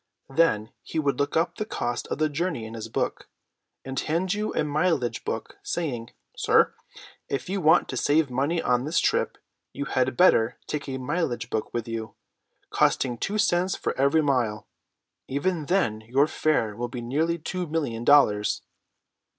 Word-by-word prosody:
Then 115 -9 +2
he - - -6
would 140 -4 +1
look 140 +2 +1
up 165 +2 +1
the - - -1
cost 120 - -3
of - - -3
the 155 +1 +2
journey 150 -5 -2
in 110 - -8
his 115 -1 -6
book, - - -2 0.6
and 135 0 -3
hand 175 +5 0
you 210 +1 -2
a - - +2
mileage 150 -4 0
book, - - -5
saying: 125 -9 -3 0.3
'Sir, - - +3 0.6
if 140 +5 -3
you 195 0 -1
want 160 +2 +5
to 130 - -3
save 145 +1 +2
money 140 +7 0
on 125 -4 +1
this 155 - +1
trip, - - +1 0.4
you 140 - -4
had 130 -2 0
better 120 -10 +4
take 145 -2 -4
a 130 - -3
mileage 125 -4 -2
book 110 - -2
with 120 -1 -3
you, 115 -1 -5 0.6
costing 125 -2 +2
two 200 - -2
cents 185 -3 +2
for - - -2
every 140 +4 +3
mile. 120 -7 0 0.6
Even 150 +3 -1
then 145 - +1
your 135 +4 +4
fare 150 -9 0
will 120 +2 -3
be 120 0 -5
nearly 155 +8 0
two 180 +2 -4
million 145 -8 -2
dollars.'" 110 -7 +4
140 Hz, 170 wpm, -26 LUFS, 120-165 Hz, 0.6 s, want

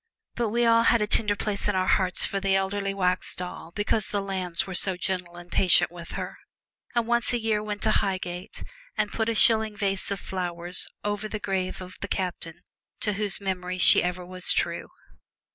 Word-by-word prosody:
But 235 -2 -1
we 235 +2 +1
all 230 0 +5
have 235 - +5
a - - +2
tender 210 -1 +2
place 205 -1 -2
in 205 - 0
our 185 0 +1
hearts 185 -1 +2
for 195 - -2
the 195 0 +1
elderly 195 +1 -1
wax 185 -2 0
doll 180 -2 -7
because 205 +3 -1
the 205 - -1
Lambs 185 -3 -2
were 190 - -7
so 185 +1 +5
gentle 180 -1 -3
and 175 0 -12
patient 180 -2 +4
with 170 -1 -9
her, - - -6 0.6
and 235 -1 +2
once 235 +1 +1
a 240 - +1
year 220 -2 0
went 210 -1 -3
to - - +4
Highgate 185 0 -2 0.3
and 210 -1 0
put 220 0 -1
a 230 - -1
shilling 220 -1 +4
vase 195 -2 0
of 200 -1 -3
flowers 175 -1 -3 0.2
over 205 +1 -2
the 215 0 -5
grave 190 -2 -3
of 185 0 -12
the 200 - -3
Captain 175 -4 -4 0.4
to 210 - 0
whose 205 0 -1
memory 185 -2 -3
she 180 - +9
was - - -1
ever 180 +1 -5
true. - - +1
195 Hz, 200 wpm, -26 LUFS, 180-210 Hz, 0.6 s, she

